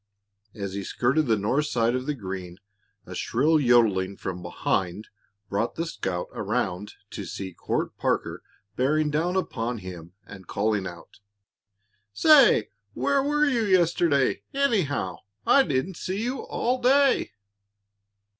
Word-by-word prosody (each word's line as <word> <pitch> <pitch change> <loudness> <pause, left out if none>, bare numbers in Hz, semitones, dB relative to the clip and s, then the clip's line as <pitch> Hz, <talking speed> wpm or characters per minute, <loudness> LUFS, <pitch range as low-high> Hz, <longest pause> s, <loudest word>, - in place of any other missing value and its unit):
As 100 -3 -5
he 100 0 -4
skirted 135 +9 +1
the 110 -2 +3
north 130 +9 0
side 115 -3 +1
of 130 +2 -3
the 150 - -1
green 95 -5 -7 0.5
a - - -9
shrill 155 +7 +2
yodeling 110 -7 +3
from 90 -1 -5
behind 90 +3 -2 0.4
brought 105 +4 -2
the 165 - -2
scout 95 - -3
around 100 +4 -2 0.2
to 100 - -6
see 95 +1 -6
Court - - -3
Parker - - -1 0.3
bearing 150 +4 +1
down 165 +5 0
upon 120 -10 -2
him, 90 -4 -9 0.3
calling 100 -2 0
out: 85 +1 -12 0.9
"Say, 275 - +6 0.3
where 280 -1 +2
were 295 +2 +2
you 260 -5 +1
yesterday, 170 -8 +2
anyhow? 165 - 0 0.3
I 280 - +6
didn't 165 - -1
see 195 +4 -3
you 250 +2 -2
all 250 +1 -1
day." 270 - +3
125 Hz, 130 wpm, -26 LUFS, -, 0.9 s, Say